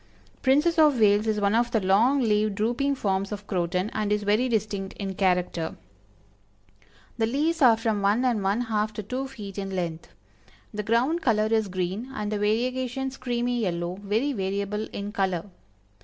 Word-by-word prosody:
Princess 300 +5 +3
of 295 -5 +5
Wales 210 0 +4
is 215 -1 +1
one 200 0 +2
of 235 +1 +2
the 235 -2 +1
long 220 +9 +3
leaved 215 -3 +1
drooping 240 +7 0
forms 195 -4 -1
of 205 -1 -6
Croton, 180 +1 -1
and 210 -1 -1
is 210 0 +1
very 215 +5 +2
distinct 205 -4 -2
in 195 -2 -4
character. 180 -3 0 1.4
The 225 - +2
leaves 305 +7 0
are 235 -4 +7
from 220 -2 -1
one 210 +6 +2
and 235 -5 +1
one 200 +4 +1
half 215 -2 -1
to 215 - -5
two 255 +6 -3
feet 205 -7 -8
in 195 -1 -4
length. 170 -3 -3 0.7
The 210 - -2
ground 245 +11 +1
color 215 -6 +2
is 220 -2 +2
green, 185 +6 -3
and 210 -2 -3
the 210 - -1
variegations 255 +5 -1
creamy 245 -1 -1
yellow, 175 -2 -2
very 220 +8 0
variable 200 +1 -2
in 205 +1 -5
color. 190 -2 -2
215 Hz, 170 wpm, -26 LUFS, 195-245 Hz, 1.4 s, are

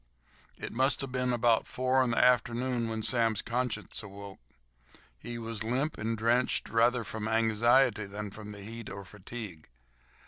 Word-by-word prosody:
It - - -6
must 130 +4 +2
have 135 -2 -5
been 125 -1 0
about 120 -2 +3
four 130 +1 +2
in 125 - 0
the 115 - -1
afternoon 120 0 +2
when 110 -1 -3
Sam's 115 -2 +1
conscience 120 -3 -2
awoke. 100 -1 -10 0.8
He 120 - -7
was 115 -1 -4
limp 130 +7 -1
and 115 +1 -1
drenched, 120 +3 +1
rather 115 +1 +3
from 110 0 -4
anxiety 110 0 +3
than 105 +1 -6
the 105 0 -9
heat 115 +1 -7
or 100 0 -7
fatigue. 100 -4 -9
115 Hz, 150 wpm, -30 LUFS, 105-125 Hz, 0.8 s, about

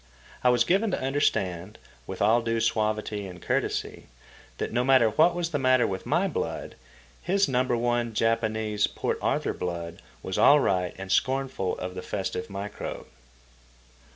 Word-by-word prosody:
I 125 - +5
was 120 -1 +4
given 195 - +2
to 185 - -1
understand, 105 -8 -1 0.3
with 95 +1 -3
all 115 +3 +4
due 115 0 -1
suavity 105 -2 -1
and 90 -1 -10
courtesy, - - -2 0.5
that - - -4
no 120 +1 +2
matter 130 -4 +4
what 170 +7 +4
was 175 -1 -2
the 145 - -1
matter 130 -1 +4
with 95 -1 -4
my - - +2
blood, - - -4 0.5
his 195 +2 +2
number 125 -1 +1
one, 120 -1 0
Japanese, 110 -2 +1
Port - - -3
Arthur - - 0
blood 85 -1 -5 0.2
was 95 - -3
all 145 +1 +7
right 90 -8 0
and 95 0 -6
scornful 130 -4 0
of 90 0 -5
the 90 - -6
festive 95 -1 -4
microbe. 100 +1 -6
115 Hz, 155 wpm, -27 LUFS, 95-130 Hz, 0.5 s, all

